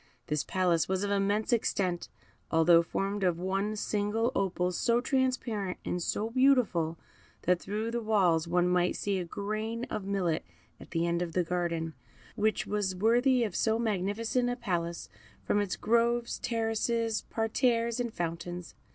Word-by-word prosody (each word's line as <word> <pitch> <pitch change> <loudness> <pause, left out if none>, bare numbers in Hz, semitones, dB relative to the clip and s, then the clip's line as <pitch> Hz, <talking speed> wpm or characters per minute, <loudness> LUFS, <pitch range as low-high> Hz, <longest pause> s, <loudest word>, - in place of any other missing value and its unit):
This 150 -1 -1
palace 180 -3 +1
was 190 +1 0
of 200 - -1
immense 200 +3 +1
extent, 185 -6 0 0.4
although 165 +1 +6
formed 195 +4 -2
of 180 -3 +2
one 195 +4 -1
single 210 +3 0
opal, 180 -2 0
so 235 +6 +2
transparent 245 -7 -1
and 175 - -2
so 215 +6 -1
beautiful 235 -11 +3 0.5
that 180 0 +3
through 215 +4 -3
the 235 0 -1
walls 185 -7 +2
one 175 +1 +2
might 180 0 +2
see 200 -2 -1
a - - -2
grain 215 +5 -3
of 210 - -2
millet 190 -5 0 0.4
at - - -12
the 165 0 0
end 170 0 0
of 170 -2 -3
the 180 - +2
garden, 170 -2 -2 0.4
which 215 -1 +1
was 205 -3 -1
worthy 240 +5 +3
of 215 - -3
so 220 0 +2
magnificent 225 +3 0
a 245 - -1
palace, 175 -7 -3 0.4
from 205 - +1
its 200 -3 -2
groves, 235 +1 +1
terraces, 225 -1 0
parterres, 230 +1 +1
and 240 -2 -1
fountains. 175 -1 -5
205 Hz, 155 wpm, -30 LUFS, 180-230 Hz, 0.5 s, although